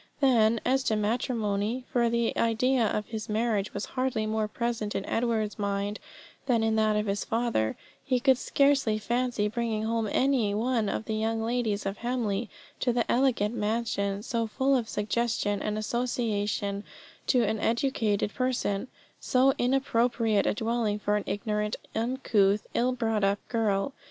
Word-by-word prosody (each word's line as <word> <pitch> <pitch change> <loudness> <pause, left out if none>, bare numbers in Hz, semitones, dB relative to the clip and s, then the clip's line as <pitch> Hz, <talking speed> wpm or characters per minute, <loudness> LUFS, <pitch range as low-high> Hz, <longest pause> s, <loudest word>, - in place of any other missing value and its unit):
Then, 230 -5 +4
as 265 +1 +3
to 220 - +2
matrimony 220 +1 -1
for 235 -1 +3
the 235 0 0
idea 230 +1 +2
of 210 0 -1
his 220 -1 -6
marriage 215 -2 0
was 200 - -4
hardly 255 -4 0
more 215 0 0
present 230 -1 -3
in 195 - -2
Edward's 225 -2 -1
mind 200 +1 -2 0.5
than 235 -4 +2
in 220 0 +2
that 215 -1 +3
of 210 0 0
his 200 0 -1
father 230 - 0 0.3
he 255 -2 +1
could 260 0 +4
scarcely 275 -8 +2
fancy 240 -1 0
bringing 220 0 -2
home 225 -1 0
any 250 -7 +2
one 225 -1 +1
of 215 - -3
the 220 - -3
young 225 +1 -1
ladies 225 -4 -1
of 195 +1 -2
Hamley 235 -3 -1 0.3
to 250 - +1
the 240 -1 +1
elegant 240 -4 +2
mansion, 210 -2 -1
so 230 -1 -1
full 270 +5 +1
of 235 -3 -1
suggestion 210 -1 -1
and 210 0 -2
association 215 -3 -1 0.4
to 250 -3 +4
an 220 0 0
educated 225 -4 0
person, 255 -4 -1 0.3
so 260 +1 +3
inappropriate 240 -4 +2
a - - +1
dwelling 225 -1 0
for 210 0 0
an 210 - 0
ignorant, 210 0 -1 0.2
uncouth, 220 -4 +1
ill 250 +2 +2
brought 225 -4 -1
up 200 +1 +3
girl. 220 +1 0
225 Hz, 155 wpm, -28 LUFS, 210-245 Hz, 0.5 s, Then